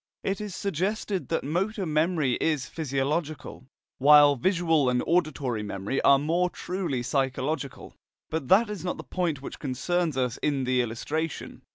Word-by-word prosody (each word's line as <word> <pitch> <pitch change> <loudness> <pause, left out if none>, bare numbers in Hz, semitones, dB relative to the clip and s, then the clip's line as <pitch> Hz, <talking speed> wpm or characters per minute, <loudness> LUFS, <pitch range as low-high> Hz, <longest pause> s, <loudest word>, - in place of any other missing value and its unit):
It 195 +1 -2
is 205 -3 -5
suggested 200 +1 -2
that 165 - -1
motor 190 +7 -1
memory 155 -3 +1
is 150 -5 +1
physiological, 145 -1 -3 0.3
while 145 +1 +7
visual 165 -2 +2
and 125 0 +1
auditory 145 -9 0
memory 105 +4 -3
are 140 - +6
more 170 +5 +1
truly 175 -10 -3
psychological. 135 +2 -2 0.4
But 155 -4 -2
that 210 - +5
is 210 -4 -6
not 180 - -2
the - - -7
point 165 -7 -2
which - - -7
concerns 155 +3 -1
us 125 -3 0
in 140 -3 0
the 125 0 +2
illustration. 145 +7 -4
150 Hz, 150 wpm, -27 LUFS, 135-175 Hz, 0.4 s, while